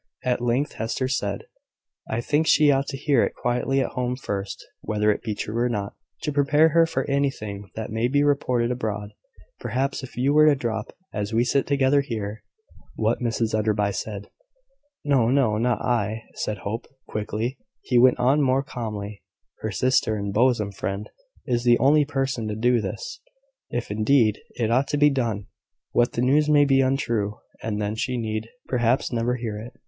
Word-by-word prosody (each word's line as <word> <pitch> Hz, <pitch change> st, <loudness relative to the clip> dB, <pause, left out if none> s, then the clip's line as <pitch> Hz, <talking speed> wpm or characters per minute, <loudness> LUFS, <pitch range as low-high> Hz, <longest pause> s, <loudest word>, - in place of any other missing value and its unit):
At 125 Hz, -1 st, 0 dB
length 125 Hz, +4 st, +1 dB
Hester 115 Hz, +4 st, -2 dB
said 100 Hz, -7 st, -2 dB, 0.7 s
"I 115 Hz, -, -1 dB
think 150 Hz, +6 st, +1 dB
she 150 Hz, -2 st, +6 dB
ought 135 Hz, 0 st, +1 dB
to 135 Hz, -, -4 dB
hear 140 Hz, -3 st, +2 dB
it -, -, -2 dB
quietly 125 Hz, +3 st, 0 dB
at -, -, -2 dB
home 125 Hz, 0 st, -2 dB
first 100 Hz, -6 st, -5 dB, 0.2 s
(whether 105 Hz, 0 st, +1 dB
it -, -, -2 dB
be 110 Hz, -3 st, -3 dB
true 105 Hz, -, -4 dB
or 120 Hz, +1 st, +1 dB
not), 100 Hz, -3 st, -3 dB, 0.3 s
to 150 Hz, -, -1 dB
prepare 145 Hz, +2 st, +4 dB
her 165 Hz, +1 st, +4 dB
for 135 Hz, -4 st, -2 dB
anything 110 Hz, -8 st, -2 dB
that 110 Hz, -1 st, -5 dB
may 110 Hz, +2 st, +1 dB
be 145 Hz, +3 st, +2 dB
reported 125 Hz, -4 st, +1 dB
abroad. 105 Hz, -4 st, -3 dB, 0.5 s
Perhaps, 135 Hz, +5 st, -1 dB
if 130 Hz, -3 st, -10 dB
you 135 Hz, +3 st, +2 dB
were 155 Hz, +1 st, +6 dB
to 150 Hz, -, +6 dB
drop, 110 Hz, -5 st, -3 dB, 0.2 s
as 105 Hz, +1 st, -3 dB
we 115 Hz, +2 st, +3 dB
sit 135 Hz, +3 st, +1 dB
together 140 Hz, 0 st, +3 dB
here, 110 Hz, -5 st, -5 dB, 0.5 s
what -, -, +1 dB
Mrs 115 Hz, -1 st, -1 dB
Enderby 105 Hz, -1 st, +1 dB
said 100 Hz, +1 st, -5 dB, 0.4 s
" 400 Hz, -, -45 dB
"No, 135 Hz, -6 st, +3 dB
no; 125 Hz, -5 st, +2 dB
not 120 Hz, +1 st, +1 dB
I," 115 Hz, -2 st, 0 dB
said 105 Hz, -, -3 dB
Hope, 110 Hz, +3 st, -3 dB, 0.2 s
quickly. 110 Hz, +4 st, -3 dB, 0.2 s
He 125 Hz, -, +2 dB
went 125 Hz, +1 st, +6 dB
on 135 Hz, +4 st, +3 dB
more 135 Hz, 0 st, +2 dB
calmly: 105 Hz, -6 st, -6 dB, 0.4 s
"Her 110 Hz, -, -3 dB
sister 110 Hz, +2 st, +1 dB
and 100 Hz, -1 st, -3 dB
bosom 115 Hz, -3 st, +2 dB
friend 100 Hz, +1 st, -4 dB, 0.3 s
is 120 Hz, -3 st, 0 dB
the 120 Hz, -1 st, +5 dB
only 145 Hz, +3 st, +4 dB
person 135 Hz, -5 st, -2 dB
to 105 Hz, -, -3 dB
do 120 Hz, +1 st, +2 dB
this 485 Hz, -, -5 dB, 0.5 s
if, 120 Hz, -3 st, -3 dB
indeed, 110 Hz, 0 st, +3 dB, 0.2 s
it 115 Hz, -2 st, 0 dB
ought 130 Hz, +4 st, +2 dB
to 145 Hz, -, -1 dB
be 145 Hz, 0 st, +5 dB
done. 115 Hz, -7 st, -1 dB, 0.5 s
But 120 Hz, 0 st, +2 dB
the 120 Hz, -, 0 dB
news 150 Hz, +4 st, +3 dB
may 145 Hz, -1 st, +6 dB
be 135 Hz, -1 st, +4 dB
untrue; 120 Hz, -6 st, 0 dB, 0.2 s
and 105 Hz, -2 st, -3 dB
then 105 Hz, 0 st, -1 dB
she 125 Hz, +3 st, -2 dB
need 110 Hz, -1 st, -3 dB, 0.2 s
perhaps 120 Hz, 0 st, +1 dB
never 120 Hz, +1 st, 0 dB
hear 115 Hz, -4 st, -4 dB
it. 115 Hz, +4 st, -9 dB
120 Hz, 185 wpm, -24 LUFS, 110-135 Hz, 0.7 s, she